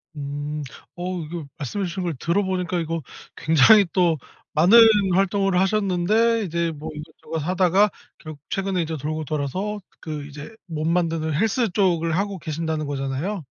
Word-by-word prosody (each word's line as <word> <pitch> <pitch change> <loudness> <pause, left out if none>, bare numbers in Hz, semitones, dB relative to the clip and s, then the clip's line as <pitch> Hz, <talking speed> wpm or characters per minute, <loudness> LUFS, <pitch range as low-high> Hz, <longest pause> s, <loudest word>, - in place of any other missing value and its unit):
음. 145 +1 -4 0.3
어. 180 +1 -4
이거 160 0 -6
말씀해 165 +7 -3
주신 185 +1 -4
걸 170 -3 -2
들어보니까 180 +2 -1
이거 165 0 -2 0.3
굉장히 160 +7 +6
또 175 -4 +3 0.4
많은 180 +10 +7 0.3
활동을 195 0 +2
하셨는데 210 +3 +2
이제 170 -2 -1
뭐 155 0 -7
이것저것 155 +1 -7
하다가 185 +5 +3 0.3
결국 155 -2 -10
최근에 195 -2 -1
이제 160 -1 -3
돌고 155 +2 -3
돌아서 160 +8 -3 0.2
그 150 -3 -6
이제 150 +9 -10
몸 160 -2 -2
만드는 165 -2 0
헬스 225 - +1
쪽을 175 -4 +1
하고 200 -1 -2
계신다는 155 -1 -3
거잖아요? 145 +7 -3
170 Hz, 325 characters per minute, -23 LUFS, 155-195 Hz, 0.4 s, 많은